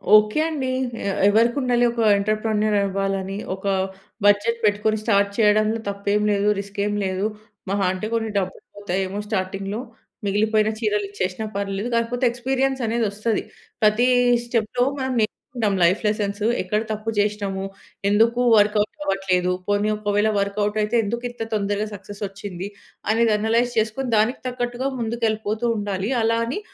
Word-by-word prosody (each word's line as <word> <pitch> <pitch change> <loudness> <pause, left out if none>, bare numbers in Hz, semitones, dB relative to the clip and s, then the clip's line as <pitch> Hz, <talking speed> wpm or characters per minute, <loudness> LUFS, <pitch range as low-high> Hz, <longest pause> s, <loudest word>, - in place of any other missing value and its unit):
Okay 215 +5 +4
అండి. 280 -5 -2 0.4
ఏ - - 0 0.2
ఎవరికి 230 +5 +3
ఉండాలి 245 -1 +2
ఒక 235 0 -2 0.2
ఎంటర్‌ప్రెన్యూర్ 215 +1 0
అవ్వాలని, 195 0 -2 0.2
ఒక 190 - -13 0.6
బడ్జెట్ 205 +3 +3
పెట్టుకొని 210 +1 +2
స్టార్ట్ 200 -2 +3
చేయడంలో 215 0 +3
తప్పేం 200 +1 0
లేదు, 200 0 +1
రిస్కేం 200 +1 -2
లేదు, 190 +1 -1 0.5
మహా 200 -1 +1
అంటే 190 +3 -4
కొన్ని 225 -1 -1
డబ్బులు 190 -1 -2
పోతాయేమో 195 -1 -2
స్టార్టింగ్‌లో, 195 +1 -2 0.5
మిగిలిపోయిన 215 +2 +2
చీరలు 210 -2 0
ఇచ్చేసినా 190 +1 -3
పర్వాలేదు, 200 +3 -2
కాకపోతే 235 +2 0
ఎక్స్‌పీరియన్స్ 265 +2 -1
అనేది 230 +1 +1
వస్తది. 215 +2 -1 0.4
ప్రతి 215 +3 +4 0.4
స్టెప్‌లో 235 +1 0 0.2
మనం 260 -1 -1
నేర్చుకొంటాం. 215 -1 -2
లైఫ్ 180 +4 +3
లెసన్స్, 205 -1 -1 0.2
ఎక్కడ 210 +4 0
తప్పు 215 +1 -4
చేసినాము? 205 -2 -1 0.5
ఎందుకు 230 +4 +3 0.2
వర్కౌట్ 210 0 +3 0.2
అవ్వట్లేదు? 190 -4 +1 0.2
పోనీ 205 +1 +1
ఒక 210 -1 -2
వేళ 210 +1 +3
వర్కౌట్ 205 +1 -1
అయితే, 210 +3 0
ఎందుకు 235 +4 -3
ఇంత 240 -1 -6
తొందరగా 205 0 0
సక్సెస్ 200 +1 -10
వచ్చింది? 195 -1 -7 0.4
అనేది 225 0 +3
అనలైజ్ 230 +3 +1
చేసుకొని, 225 +4 0
దానికి 220 +5 +2
తగ్గట్టుగా 245 +1 -2
ముందుకు 235 0 -1
ఎళ్ళిపోతూ 215 +1 -2
ఉండాలి. 200 0 -2
అలా 225 +1 +2
అని 245 - -3
210 Hz, 140 wpm, -23 LUFS, 200-230 Hz, 0.6 s, Okay